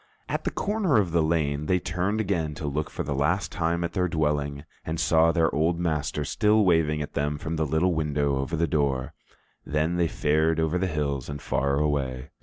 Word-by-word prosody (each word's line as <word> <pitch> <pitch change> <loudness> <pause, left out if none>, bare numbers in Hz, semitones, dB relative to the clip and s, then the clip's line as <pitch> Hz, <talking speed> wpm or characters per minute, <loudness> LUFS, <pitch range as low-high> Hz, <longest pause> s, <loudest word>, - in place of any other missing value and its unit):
At - - -3
the - - +2
corner 200 - 0
of 95 -5 +2
the 85 0 +3
lane 75 -2 0
they 90 - +3
turned 90 +4 -1
again 85 -8 -1
to 80 - -6
look 75 +2 -2
for - - -4
the 70 - -3
last 75 +8 0
time 85 0 -1
at 85 - -3
their 90 -1 +1
dwelling, 75 -3 -1 0.2
and 80 +1 -3
saw 80 0 +4
their 85 -1 +1
old 80 +3 +1
master 75 -3 -1
still 105 +5 +3
waving 80 -4 +2
at - - -8
them 75 +1 -1
from 80 +3 -4
the 80 -1 0
little 80 +5 +2
window 75 -3 0
over 70 +5 -2
the 85 +1 +1
door. 70 -5 0 0.5
Then 80 +4 0
they 85 -1 +2
fared 80 +2 +1
over 80 +2 +1
the 95 - 0
hills 70 -5 -2
and 70 0 -5
far 70 0 0
away. 70 -3 -1
80 Hz, 210 wpm, -26 LUFS, 75-85 Hz, 0.5 s, saw